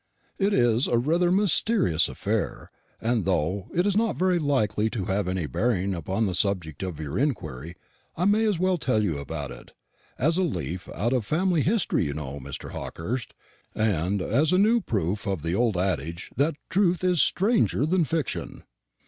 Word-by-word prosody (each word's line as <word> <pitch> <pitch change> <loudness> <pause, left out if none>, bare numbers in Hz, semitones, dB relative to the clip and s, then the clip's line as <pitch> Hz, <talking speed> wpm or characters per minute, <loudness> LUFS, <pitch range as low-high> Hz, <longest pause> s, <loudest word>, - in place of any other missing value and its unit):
It 200 +1 +2
is 120 - +3
rather 155 +9 +2
a - - +2
mysterious 195 - +3
affair; - - -3 0.3
and 115 -2 0
though 90 +2 0
it 175 +2 +1
is 205 -2 +1
not 225 0 +1
very 180 -1 +2
likely 110 -8 +1
to 110 -5 -3
have 95 0 -1
any 90 -3 -1
bearing 100 - 0
upon 95 +5 -1
the 90 -3 +2
object 90 -8 -3
of 90 -5 -4
your 75 +4 -3
inquiry, 85 - -2 0.4
I 175 - +1
may 210 +3 +3
as 205 -4 +1
well 185 0 +1
tell 125 -7 +1
you 80 -8 -1
about 70 -2 -5
it, - - -12 0.4
as 160 +6 +2
a - - +3
leaf 90 - -3
out 120 +4 0
of 125 -3 +1
family 170 - +1
history, 190 - +1
you 70 -1 -3
know, 70 -2 -5
Mr. 65 - -7
Hawkehurst, 115 +10 -5 0.4
and 100 -2 0
as 145 +8 +2
a 185 - +4
new 225 +4 +4
proof 100 - -2
of 95 -6 -2
the 85 +1 -1
old 110 -1 +1
adage 85 -2 -2
that 145 +4 +1 0.2
truth 185 -2 +2
is 180 -5 +3
stranger 205 - +2
than 175 +2 +2
fiction." 160 -3 -3
110 Hz, 180 wpm, -26 LUFS, -, 0.4 s, a